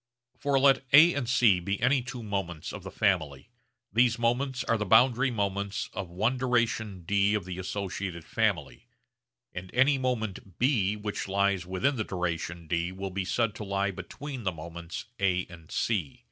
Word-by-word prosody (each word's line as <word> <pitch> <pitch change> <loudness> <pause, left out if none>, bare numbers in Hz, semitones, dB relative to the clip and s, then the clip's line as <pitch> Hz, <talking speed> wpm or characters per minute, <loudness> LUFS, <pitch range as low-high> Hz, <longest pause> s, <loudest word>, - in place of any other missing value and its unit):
For 140 -1 +1
let 135 0 +5
A 165 +4 +9
and 130 -5 -2
C 115 -7 +4
be 100 +3 -2
any 135 -1 +3
two 125 -1 -7
moments 95 -6 -4
of - - -7
the - - -8
family, 85 - 0 0.4
these 120 +1 +4
moments 125 +3 0
are 115 - +1
the - - 0
boundary 125 +6 +4
moments 100 -3 -2
of 95 -3 -5
one 110 +9 0
duration 115 -6 0
d 100 +3 +2
of 105 -4 -2
the 90 0 -6
associated 95 -2 -4
family, - - -1 0.7
and 90 +1 -7
any 135 +2 +4
moment 110 -7 -3
B 115 -6 +2
which 105 -1 -4
lies 100 -2 +1
within 95 +10 0
the 110 - 0
duration 85 -2 -3
d 85 +2 -1
will 95 +1 -5
be 95 0 -2
said 115 +2 0
to 105 - -7
lie 100 0 0
between 130 - -7
the 95 -4 -1
moments 85 +1 -7
A 90 -2 +1
and 80 -2 -13
C. 95 -11 -1
100 Hz, 175 wpm, -28 LUFS, 90-120 Hz, 0.7 s, A